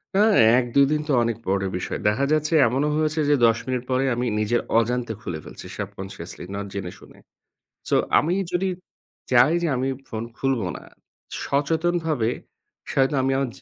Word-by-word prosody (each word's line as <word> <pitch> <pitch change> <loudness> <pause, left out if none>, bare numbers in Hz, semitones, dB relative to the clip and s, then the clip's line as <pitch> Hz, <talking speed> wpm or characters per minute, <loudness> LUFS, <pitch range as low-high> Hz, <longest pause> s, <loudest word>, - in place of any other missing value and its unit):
হ্যাঁ, 210 +1 +5 0.2
১-২ 130 +3 +3
দিন 150 0 +1
তো - - -1
অনেক 115 -2 -1
পরের 95 0 0
বিষয়। 90 - -4
দেখা 110 +7 +2
যাচ্ছে 155 +1 +1
এমনও 135 +6 0
হয়েছে 155 0 0
যে 145 - +5
১০ 115 -1 +4
মিনিট 125 -2 -1
পরে 130 +1 +1
আমি 125 +1 -1
নিজের 110 +3 +1 0.2
অজান্তে 120 0 -1
খুলে 80 -3 -5
ফেলছি - - -11
subconsciously, 95 -4 -7
নট 100 0 -4
জেনে 95 -3 -4
শুনে। - - -17 0.7
So - - +3 0.2
আমি 165 +4 0 0.2
যদি 190 +2 0 0.6
চাই 125 +4 +6
যে - - +2
আমি 130 +1 -1 0.2
ফোন 110 0 -4
খুলবো 130 -8 0
না - - -11 0.6
সচেতনভাবে, 160 -3 0 0.6
হয়তো 135 +2 +2
আমি 135 - +1
আর 135 - 0
130 Hz, 165 wpm, -23 LUFS, 110-150 Hz, 0.7 s, চাই